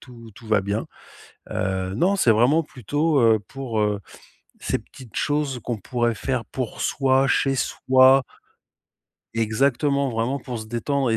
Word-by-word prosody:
tout 115 -3 -13
tout 115 - -13
va 105 -2 +3
bien, 100 +3 -2 0.6
heu, 95 0 -2
non, 185 - +2
c'est 125 -12 +4
vraiment 125 +9 +3
plutôt, 145 +4 -1
heu, 115 -2 +5
pour, 130 -5 -3
heu, 105 -1 0 0.6
ces - - -1
petites 125 -5 -14
choses 145 -3 0
qu'on 120 -3 -3
pourrait 120 +3 -1
faire 125 +3 -2
pour 125 0 -5
soi, 135 0 +2
chez 135 -1 +2
soi 130 +1 +4 1.1
exactement, 135 +5 +1
vraiment 115 +4 -1
pour 125 -3 -6
se 110 - -7
détendre 125 +3 -1
et 115 - +2
125 Hz, 150 wpm, -23 LUFS, 110-135 Hz, 1.1 s, heu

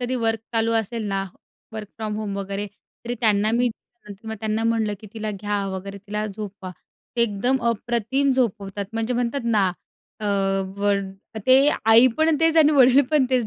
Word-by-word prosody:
कधी 245 +1 -2
वर्क 225 0 +1
चालू 225 0 +1
असेल 220 0 -5
ना 195 0 -1 0.5
वर्क 215 -2 -7
फ्रॉम 215 -1 -4
होम 205 -2 -4
वगैरे, 200 +1 -4 0.4
तरी 240 +1 -3
त्यांना 215 -1 +3
मी 245 +1 +2 0.7
त्यांना 220 +1 -1
म्हटलं 225 -2 0
की 215 - -11
तिला 215 -1 -3
घ्या 205 0 -3
वगैरे 195 +1 -7
तिला 210 +2 -4
झोपवा, 200 -2 -7 0.5
ते 235 - +4
एकदम 235 +4 +1
अप्रतिम 240 +4 0
झोपवतात 205 -5 -1
म्हणजे 225 +2 -1
म्हणतात 245 +3 -1
ना 210 -5 +2 0.5
अ, - - -5 0.5
व 205 0 +1 0.6
ते 255 - +7 0.4
आई 230 +3 +8
पण 315 -1 +3
तेच 325 0 +3
आणि 305 -1 +6
वडील 265 0 +6
पण 295 -4 +4
तेच 250 -4 +1
220 Hz, 165 wpm, -23 LUFS, 205-245 Hz, 0.7 s, आई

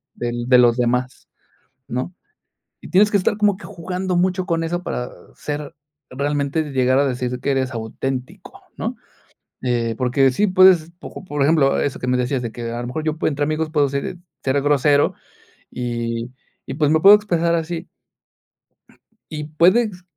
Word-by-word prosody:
del 120 0 -4
de 125 - +7
los 120 -1 +4
demás, 125 +1 -1 0.6
¿no?, 130 +9 -3 0.7
y - - -10
tienes 205 +3 +4
que 205 - +4
estar 200 +2 0
como 210 -2 +3
que 210 - -12
jugando 180 0 -3
mucho 185 +1 +1
con 165 -2 0
eso, 175 +2 -2
para 125 -6 -4 0.2
ser 145 -1 -6 0.3
realmente 145 +3 -1
llegar 130 -1 +2
a 140 - +3
decir, 125 -1 -3
que - - 0
eres 130 -1 0
auténtico, 125 +3 -5 0.2
¿no?, - - -4 0.7
eh, 120 -2 0
porque 130 +2 +3
sí 205 +11 +2
puedes, 185 -3 +5
poco - - -9
por 145 -5 -4
ejemplo, 140 -1 +3
eso 140 - -2
que 125 - -4
me 125 - +2
decías, 125 +1 -1
de 120 - -4
que 120 0 -6
a 120 - -4
lo 120 - -5
mejor, 155 +5 -4
yo 155 0 -2
puedo - - +1
entre 145 0 -1
amigos 155 +1 -2
puedo 145 -3 +2
ser 140 +6 -3 0.3
ser 135 +1 +1
grosero 145 0 +3 0.6
y 120 -1 -3 0.4
y, - - -5
pues, 150 0 +1
me 160 0 +3
puedo 200 +4 +9
expresar 170 -5 0
así. 165 +1 -4 1.4
Y 150 -1 -4
puedes 180 +5 +2
145 Hz, 175 wpm, -20 LUFS, 125-170 Hz, 1.4 s, puedo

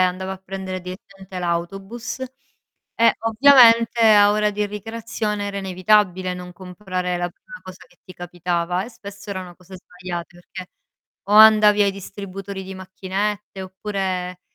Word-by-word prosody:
andava 185 +1 -1
a - - -6
prendere 190 -1 -6
direttamente 190 +1 -10
l'autobus, 195 +8 -4 0.8
e 230 0 +4
ovviamente 230 0 +5
a 205 -2 +6
ora 210 0 +1
di 210 0 -2
ricreazione 210 0 -4
era 200 - -5
inevitabile 185 -1 +1
non 180 0 -9
comprare 180 0 -4
la 175 0 -3
prima - - -14
cosa 185 -1 -12
che 175 - -27
ti 185 - -12
capitava, 175 0 -3
e 235 - -10
spesso 200 -3 -11
erano 185 -2 -6
cose 185 +1 -13
sbagliate, 180 -1 -8
perchè 185 -1 -8 0.6
o - - -1
andavi 215 -1 +7
ai 200 - +2
distributori 195 0 -8
di 190 0 -8
macchinette, 190 +1 -4
oppure, 185 -2 -4
190 Hz, 140 wpm, -21 LUFS, 180-210 Hz, 0.8 s, andavi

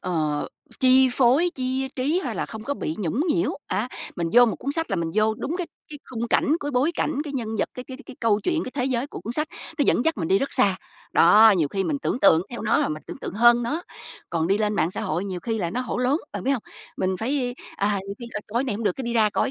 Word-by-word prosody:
ờ, 155 -5 -1 0.3
chi 260 0 +6
phối, 270 +8 +4
chia 260 +1 -2
trí 295 +8 +1
hay - - -3
là - - -2
không 220 -1 -8
có 285 - -2
bị 155 - -3
nhũng 200 - -1
nhiễu 340 +3 +2 0.2
á. 205 +6 -1 0.3
Mình 170 -1 -1
vô 245 0 +8
một 225 - -1
cuốn 280 - -3
sách 325 +2 -2
là 195 - 0
mình 165 -1 -2
vô 215 0 +3
đúng 305 +9 -3
cái 360 - -2 0.2
cái 295 - -8
khung 235 -1 -3
cảnh, - - +2
cái 290 - -3
bối 275 +5 +2
cảnh, 295 -2 -1
cái 290 - -6
nhân 245 -5 -3
vật, - - +1
cái 250 - -7
cái 260 - -7
cái 265 - -10
câu 215 -3 +2
chuyện, 330 +2 0
cái - - -6
thế 255 -3 0
giới 255 0 0
của - - -9
cuốn 230 - -5
sách, 305 +5 -1 0.3
nó - - +4
dẫn 245 - +2
dắt 325 - +1
mình 165 -3 -2
đi 195 - +4
rất 275 - -2
xa. 195 -2 +3 0.4
Đó, 210 +6 +7
nhiều 155 -4 +1
khi 195 +5 -2
mình 290 - -1
tưởng 265 - -2
tượng 165 -3 +6
theo 240 - -6
nó, 220 +1 +2
rồi - - +1
mình 155 0 -5
tưởng - - -8
tượng - - -6
hơn 240 +2 +5
nó. 295 +9 -2 0.5
Còn 165 -1 0
đi 195 +3 +2
lên 210 -1 0
mạng 170 - +1
xã - - -3
hội 170 +5 -2
nhiều 185 -3 -4
khi 225 +1 -2
là 170 -4 -1
nó 245 - -2
hổ 250 - -3
lốn, 255 +3 +2 0.2
bạn - - -4
biết 265 - +1
hông? 260 -6 0 0.3
Mình 185 0 0
phải, 245 +3 -1 0.2
à, 200 0 +1
nhiều 200 - -5
khi 240 - -7 0.2
coi 235 +4 0
là - - -7
này 235 - -1
hổng 220 +2 -4
được, 205 - +2
cái 270 - -4
đi 235 - -2
ra 215 -2 +4
coi - - +1
235 Hz, 285 wpm, -24 LUFS, 200-265 Hz, 0.5 s, vô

